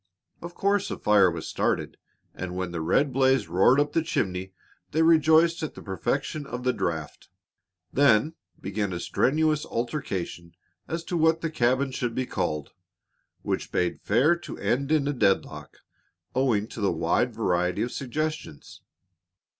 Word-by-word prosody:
Of 170 +1 -8
course 200 0 +1
a - - -4
fire 105 -3 +4
was 85 -2 -5
started, - - -1 0.4
and 90 0 -6
when 90 -1 -3
the 85 -1 -4
red 135 - +1
blaze 130 -4 +3
roared 95 +11 +4
up 145 0 0
the 165 - +2
chimney 95 - -2 0.4
they 160 +2 +1
rejoiced 160 +1 +4
at 155 - -4
the - - -10
perfection 135 - -3
of 125 -1 -5
the 125 0 +2
draught. 80 -3 -4 0.6
Then 140 +1 +4 0.3
began 100 0 -3
a 85 - -3
strenuous 155 - +1
altercation 95 - -4 0.3
as 165 0 -3
to 175 - -4
what 160 0 +3
the 165 - -2
cabin 130 0 +1
should 120 -2 -3
be 130 - -1
called 75 - -3 0.7
which - - -3
bade 90 -1 -1
fair 155 +7 +3
to 170 -4 -9
end 140 +4 -1
in 150 -3 +2
a 145 - 0
deadlock, 105 -7 0 0.6
owing 125 -6 +1
to 115 - -8
the 100 - +2
wide 85 +9 +1
variety 90 -4 0
of 120 - -3
suggestions. 150 - -5
125 Hz, 155 wpm, -26 LUFS, 95-155 Hz, 0.7 s, fire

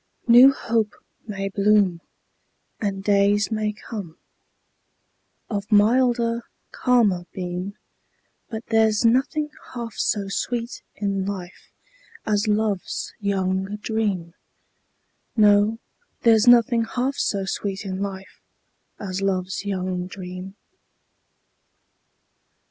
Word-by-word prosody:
New 245 +3 +9
hope 225 -5 -1 0.3
may 195 -2 -3
bloom, 200 -3 +2 0.8
And 195 -2 -3
days 205 +1 +3
may 215 -1 0
come, 205 -5 -8 1.3
Of 205 0 -4
milder, 235 +2 +3 0.3
calmer 215 -9 +2
beam, 180 +2 -5 0.7
But 225 0 -6
there's 220 0 +3
nothing 290 +5 +2 0.2
half 235 -2 -5
so 205 -2 -1
sweet 235 +4 -3
in 195 -2 -2
life 190 -3 -7 0.6
As 210 0 +1
love's 210 -2 -1
young 190 -1 -1
dream; 210 -6 -2 1.0
No, 210 +1 +5 0.4
there's 225 -1 +4
nothing 235 -1 +6
half 255 +2 0
so 195 -2 -1
sweet 195 +1 -3
in 190 0 -4
life 195 -1 -6 0.6
As 190 -1 -4
love's 190 0 -1
young 185 -2 -2
dream. 185 0 -8
205 Hz, 95 wpm, -23 LUFS, 195-225 Hz, 1.3 s, New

